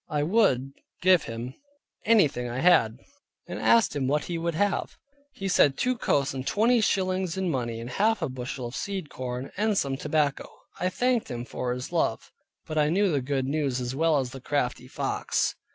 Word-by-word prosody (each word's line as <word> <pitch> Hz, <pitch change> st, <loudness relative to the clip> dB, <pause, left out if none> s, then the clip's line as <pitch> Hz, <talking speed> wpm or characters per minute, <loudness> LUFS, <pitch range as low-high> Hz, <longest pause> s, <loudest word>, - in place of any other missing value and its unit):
I 150 Hz, -2 st, 0 dB
would 150 Hz, -, +2 dB, 0.3 s
[give 185 Hz, -3 st, +5 dB
him] 115 Hz, +3 st, -6 dB, 0.5 s
anything 150 Hz, -, +3 dB
I 120 Hz, -, -4 dB
had, 130 Hz, -8 st, +4 dB, 0.5 s
and -, -, -5 dB
asked 230 Hz, -9 st, +4 dB
him 135 Hz, -3 st, 0 dB
what 150 Hz, +2 st, +1 dB
he 175 Hz, -, -4 dB
would 170 Hz, -1 st, -2 dB
have? 200 Hz, +3 st, -1 dB, 0.4 s
He 195 Hz, -, -4 dB
said 145 Hz, -7 st, +4 dB
two 255 Hz, 0 st, +1 dB
coats 140 Hz, -, 0 dB
and 130 Hz, 0 st, -5 dB
twenty 230 Hz, +3 st, +3 dB
shillings 185 Hz, -3 st, 0 dB
in 190 Hz, -2 st, 0 dB
money, 120 Hz, -4 st, -2 dB
and 115 Hz, -, -6 dB
half 215 Hz, -, +1 dB
a -, -, +1 dB
bushel 130 Hz, -1 st, -5 dB
of 120 Hz, -, -6 dB
seed 190 Hz, -6 st, -4 dB
corn, 125 Hz, +1 st, -5 dB
and 210 Hz, 0 st, +1 dB
some 135 Hz, -4 st, 0 dB
tobacco. 145 Hz, -1 st, 0 dB, 0.3 s
I 180 Hz, -, +1 dB
thanked 245 Hz, +3 st, 0 dB
him 120 Hz, -1 st, -5 dB
for 125 Hz, 0 st, -3 dB
his 125 Hz, +1 st, -5 dB
love; -, -, -1 dB, 0.3 s
but 155 Hz, 0 st, -2 dB
I 150 Hz, 0 st, +3 dB
knew 195 Hz, +3 st, +2 dB
the 145 Hz, -3 st, +1 dB
good 135 Hz, 0 st, -1 dB
news 140 Hz, -2 st, -1 dB
as 125 Hz, 0 st, -3 dB
well 160 Hz, +2 st, +2 dB
as 130 Hz, -2 st, -2 dB
the 135 Hz, -, -9 dB
crafty 125 Hz, -2 st, -2 dB
fox. -, -, -1 dB
145 Hz, 195 wpm, -27 LUFS, 130-190 Hz, 0.5 s, give